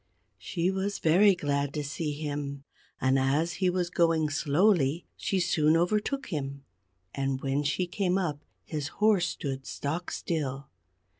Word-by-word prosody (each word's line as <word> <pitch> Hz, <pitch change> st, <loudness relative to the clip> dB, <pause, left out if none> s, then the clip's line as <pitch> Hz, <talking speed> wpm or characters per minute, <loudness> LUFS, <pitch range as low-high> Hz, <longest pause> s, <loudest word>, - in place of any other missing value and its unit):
She 175 Hz, +1 st, -1 dB
was 195 Hz, +1 st, -2 dB
very 190 Hz, +5 st, +5 dB
glad 145 Hz, -3 st, -1 dB
to 150 Hz, -, -1 dB
see 150 Hz, +1 st, -3 dB
him, 145 Hz, -2 st, -4 dB, 0.4 s
and 130 Hz, +1 st, +3 dB
as 145 Hz, +6 st, +1 dB
he 185 Hz, -, +4 dB
was 180 Hz, -1 st, -1 dB
going 165 Hz, -3 st, +2 dB
slowly, 155 Hz, +1 st, +2 dB
she 195 Hz, -, -1 dB
soon 160 Hz, -2 st, +3 dB
overtook 215 Hz, +10 st, 0 dB
him; 140 Hz, -4 st, -4 dB, 0.5 s
and 135 Hz, -1 st, -1 dB
when 135 Hz, +1 st, 0 dB
she 150 Hz, +5 st, 0 dB
came 180 Hz, +1 st, 0 dB
up, 155 Hz, -6 st, -2 dB, 0.2 s
his 150 Hz, -3 st, -3 dB
horse 210 Hz, -4 st, +4 dB
stood 135 Hz, -5 st, -4 dB
stock 160 Hz, +5 st, -3 dB
still. 140 Hz, -4 st, -3 dB
155 Hz, 145 wpm, -28 LUFS, 140-180 Hz, 0.5 s, very